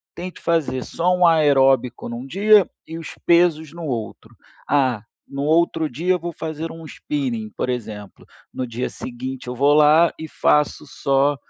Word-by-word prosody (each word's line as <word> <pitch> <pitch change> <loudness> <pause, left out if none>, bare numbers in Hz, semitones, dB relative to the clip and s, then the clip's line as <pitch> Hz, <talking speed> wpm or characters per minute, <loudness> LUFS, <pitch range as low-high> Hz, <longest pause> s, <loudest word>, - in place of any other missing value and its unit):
tente 180 0 -7
fazer 150 -6 -1
só 175 +2 0
um 180 - +4
aeróbico 135 -6 +3
num 120 +2 -6
dia, 205 +3 +4 0.2
e 165 - -7
os 165 - -9
pesos 165 -3 +3
no 170 -1 -8
outro. 115 -6 -6 0.3
"Ah, 130 -6 +2 0.3
no 140 - -6
outro 160 0 +2
dia 170 +9 -1
eu 180 - -1
vou 170 +1 -5
fazer 160 +1 -5
um 165 -1 -10
spinning", 245 - -4
por 125 - -2
exemplo, 105 -5 -6 0.3
no 130 - -4
dia 120 +1 -4
seguinte 130 +1 -7
eu 125 - -4
vou 140 +3 +3
lá 155 +3 +5
e 160 - -6
faço 150 +1 +1
só 140 +1 +1
150 Hz, 165 wpm, -21 LUFS, 130-170 Hz, 0.3 s, lá